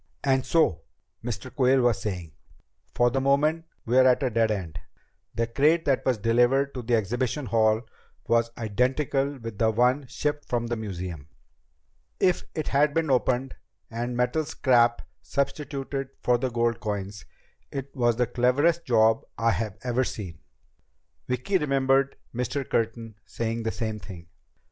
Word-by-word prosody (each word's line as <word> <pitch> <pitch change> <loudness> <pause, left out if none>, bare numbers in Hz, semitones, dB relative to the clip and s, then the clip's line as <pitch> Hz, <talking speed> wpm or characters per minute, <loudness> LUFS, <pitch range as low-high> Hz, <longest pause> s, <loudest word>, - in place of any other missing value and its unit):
and 130 -1 +1
so," 95 - +2 0.4
Mr. 120 +1 -5
Quayle 130 0 +4
was 120 -3 +2
saying, 90 -6 -4 0.6
"for 120 0 +3
the 135 - 0
moment 150 +4 +2 0.2
we're 130 +2 +5
at 130 +2 +3
a 130 - 0
dead 115 0 +2
end. 85 -6 -3 0.6
The 115 +1 +1
crate 150 +8 +2
that 135 -2 +1
was 130 -3 +1
delivered 120 +6 +2
to 125 - -4
the 120 0 +1
exhibition 120 +6 -1
hall 110 0 +2 0.4
was 115 0 +2
identical 135 +5 0
with 115 -4 -8
the 110 - +3
one 125 +5 +2
shipped 150 +3 -3
from 120 -1 0
the 120 0 -2
museum. 90 -8 -6 0.9
If 180 -2 +2
it 155 - -2
had 145 +2 +2
been 160 -3 +1
opened 130 +1 +1 0.4
and 120 +2 -3
metal 125 +6 +1
scrap 120 -5 +2 0.2
substituted 140 -1 -3
for 120 -1 +3
the 130 - -1
gold 120 -1 0
coins, 100 -2 -4 0.5
it 135 0 -6
was 120 -3 +2
the 125 +1 +2
cleverest 145 +9 +2
job 110 -2 +3
I've 110 -3 0
ever 125 +1 +1
seen." 90 -10 -6 0.9
Vicki 130 +10 0
remembered 135 -1 +2 0.2
Mr. 125 +3 -2
Curtin 115 -1 -2
saying 115 0 -3
the 110 0 -1
same 110 -2 -3
thing. 90 -4 -11
120 Hz, 150 wpm, -26 LUFS, 115-135 Hz, 0.9 s, we're